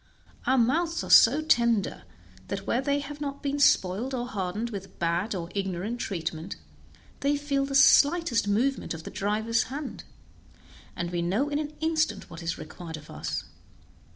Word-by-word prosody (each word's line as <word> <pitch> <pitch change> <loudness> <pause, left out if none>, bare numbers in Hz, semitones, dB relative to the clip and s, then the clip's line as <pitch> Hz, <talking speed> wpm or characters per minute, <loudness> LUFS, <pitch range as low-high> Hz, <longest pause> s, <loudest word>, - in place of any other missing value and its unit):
Our 260 - +4
mouths 325 +8 +1
are - - -5
so 280 +7 +7
tender 235 -8 +2 0.4
that 195 0 -4
where 240 - +1
they 285 +1 0
have 290 +1 -8
not 280 -1 -5
been 285 0 -1
spoiled 230 +1 +3
or 245 -1 -2
hardened 210 +1 -3
with 195 -2 -8
bad 170 +5 0
or 170 -2 -5
ignorant 195 +4 -3
treatment, 165 -6 -4 0.6
they 285 +1 +1
feel 280 -1 -1
the 275 - -3
slightest 285 -4 +5
movement 235 0 0
of 160 - -9
the - - -8
driver's 220 +3 0
hand, 280 0 -6 0.9
and 175 0 -3
we 175 -1 -1
know 200 +12 0
in 290 0 -1
an 305 0 -4
instant 315 -10 0
what 165 0 -8
is 165 0 -3
required 160 +1 -8
of 150 - -13
us. - - -4
235 Hz, 165 wpm, -27 LUFS, 185-280 Hz, 0.9 s, so